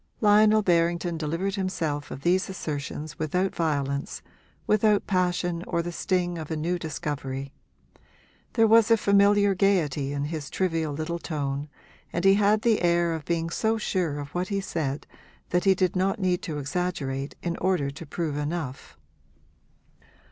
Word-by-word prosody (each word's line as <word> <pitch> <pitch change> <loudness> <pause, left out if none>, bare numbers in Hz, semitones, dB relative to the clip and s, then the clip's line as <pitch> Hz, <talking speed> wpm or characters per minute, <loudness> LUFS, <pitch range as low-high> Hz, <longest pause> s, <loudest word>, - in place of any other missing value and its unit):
Lionel 215 0 +5
Berrington 170 -1 +1
delivered 165 +5 -2
himself 165 -7 -2
of 135 - -7
these 185 +3 +2
assertions 150 -4 -5
without 180 +5 0
violence, 140 -3 -2 0.4
without 215 -1 +3
passion 180 -2 0
or 170 - 0
the 175 - -4
sting 175 -1 -1
of 155 - -7
a 160 - -2
new 175 +3 -1
discovery; 140 -4 -4 1.0
there 225 -2 +4
was 225 0 +5
a 230 - +6
familiar 200 0 +4
gaiety 165 -8 +1
in 145 0 -2
his 150 -1 -4
trivial 165 -4 -1
little 160 +4 -3
tone 145 -3 -3 0.4
and 170 +2 -2
he 195 - +7
had 210 +1 +3
the 230 -3 +3
air 170 -1 +2
of 160 -3 -5
being 165 -1 -1
so 220 +5 +1
sure 180 -8 -1
of 145 0 -7
what 180 +1 -1
he 200 0 -1
said 155 -7 -3 0.5
that 180 +2 +1
he 195 -1 +5
did 185 0 +1
not 190 +3 +1
need 185 -3 0
to 155 -3 -4
exaggerate 145 -3 -3
in 170 -1 -1
order 175 -7 0
to 140 - -9
prove 155 -1 -3
enough. 150 -3 -4
170 Hz, 155 wpm, -26 LUFS, 150-190 Hz, 1.0 s, he